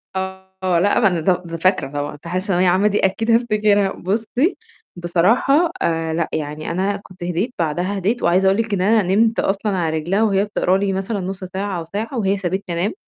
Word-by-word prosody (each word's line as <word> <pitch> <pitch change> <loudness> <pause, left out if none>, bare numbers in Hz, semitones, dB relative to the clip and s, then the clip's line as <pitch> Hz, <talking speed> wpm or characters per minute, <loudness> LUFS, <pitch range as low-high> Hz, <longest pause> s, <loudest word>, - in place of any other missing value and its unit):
آه، 190 -1 -2
لأ، 200 +4 +3
ما 215 - +4
أنا 180 -3 0
دو 180 +4 +3
د 165 -1 -6
فاكرة 185 +3 +1
طبعًا 145 0 -3
إمتحانات 170 +5 -4
ثانوية 185 -2 +1
عامة 185 +4 +3
دي 210 0 +1
أكيد 225 +4 0
هافتكرها، 210 -4 +2
بُصّي، 230 - -1 0.4
بصراحة 220 - +2
آآ 165 -1 0
لأ، 165 0 -1
يعني 150 +1 -4
أنا 190 +4 0
كنت 185 -2 -12
هديت، 180 +8 -2
بعدها 175 +5 -1
هديت 210 +6 -1
وعايزة 185 +3 +3
أقول 190 +1 +3
لِك 225 -2 -1
إن 190 - 0
أنا 215 +3 +4
نمت 225 +1 +3
أصلًا 200 0 0
على 160 -2 0
رجلها 180 +7 0
وهي 200 -2 +2
بتقرا 190 -3 +1
لي 195 0 0
مثلًا 195 +3 -2
نُص 190 +1 -5
ساعة 190 0 -3
أو 165 - -6
ساعة 225 +5 -3
وهي 200 -2 +1
سابتني 185 -1 -3
أنام. 200 - 0
190 Hz, 200 wpm, -20 LUFS, 175-205 Hz, 0.4 s, ما